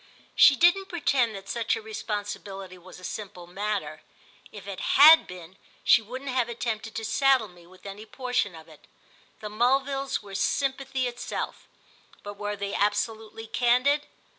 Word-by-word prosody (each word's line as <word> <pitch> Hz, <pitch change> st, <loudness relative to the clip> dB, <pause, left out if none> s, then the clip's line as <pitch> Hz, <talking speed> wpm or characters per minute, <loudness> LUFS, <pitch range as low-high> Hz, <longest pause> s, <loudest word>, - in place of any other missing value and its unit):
She 285 Hz, -, +7 dB
didn't 355 Hz, +5 st, +3 dB
pretend 265 Hz, -, 0 dB
that 195 Hz, 0 st, -10 dB
such 230 Hz, +1 st, -1 dB
a -, -, -5 dB
responsibility 205 Hz, -3 st, -6 dB
was 185 Hz, +1 st, -14 dB
a -, -, -16 dB
simple 185 Hz, -2 st, -7 dB
matter; 205 Hz, +3 st, -4 dB, 0.5 s
if 205 Hz, -, -11 dB
it 200 Hz, -2 st, -7 dB
had 310 Hz, +4 st, +7 dB
been 180 Hz, 0 st, -11 dB, 0.3 s
she -, -, +6 dB
wouldn't 255 Hz, +5 st, -7 dB
have 250 Hz, -2 st, 0 dB
attempted 225 Hz, -2 st, -4 dB
to 225 Hz, -, -4 dB
saddle 265 Hz, -1 st, +3 dB
me 175 Hz, -2 st, -18 dB
with 185 Hz, +2 st, -19 dB
any 205 Hz, +2 st, -9 dB
portion 250 Hz, -8 st, -2 dB
of 160 Hz, 0 st, -13 dB
it. 155 Hz, -2 st, -18 dB, 0.5 s
The 210 Hz, -, -5 dB
Mulvilles 270 Hz, +5 st, 0 dB
were 200 Hz, -1 st, -12 dB
sympathy 265 Hz, +4 st, -1 dB
itself, 245 Hz, 0 st, -5 dB, 0.6 s
but 205 Hz, -, -7 dB
were 205 Hz, 0 st, -4 dB
they 200 Hz, 0 st, -5 dB
absolutely 220 Hz, +2 st, -2 dB
candid? 255 Hz, +6 st, +2 dB
220 Hz, 155 wpm, -26 LUFS, 200-260 Hz, 0.6 s, She